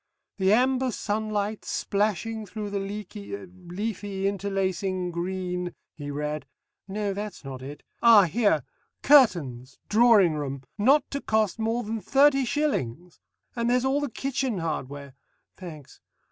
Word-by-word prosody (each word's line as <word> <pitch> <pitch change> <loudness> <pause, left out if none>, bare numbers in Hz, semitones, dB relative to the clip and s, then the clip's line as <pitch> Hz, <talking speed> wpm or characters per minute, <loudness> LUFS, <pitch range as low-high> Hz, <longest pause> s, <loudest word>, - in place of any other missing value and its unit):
"The 190 0 +3
amber 255 +3 +3
sunlight 215 -1 -2
splashing 215 +2 -1
through 210 +1 -5
the 200 - -1
leaky 200 0 -6
leafy 190 +2 -4
interlacing 190 -2 -1
green," 180 0 -3 0.2
he 145 -2 -7
read. 150 +1 -3 0.4
"No! 200 0 -2
that's 205 -5 -6
not 130 -1 -7
it. 140 +3 -9 0.2
Ah, 230 -3 +8
here! 185 - +2 0.4
Curtains! 150 - +4
Drawing 215 -6 +6
room 140 -3 -4
not 265 +8 +4
to 280 - -3
cost 220 -3 +1
more 225 +2 0
than 220 0 -4
thirty 275 +1 +4
shillings! 180 - -2 0.4
And 235 0 0
there's 250 +1 +2
all 275 +2 +2
the 290 - -2
Kitchen 265 -2 -2
Hardware! 145 -4 -4 0.4
(Thanks.) 155 -7 -11
200 Hz, 130 wpm, -26 LUFS, 175-225 Hz, 0.4 s, Ah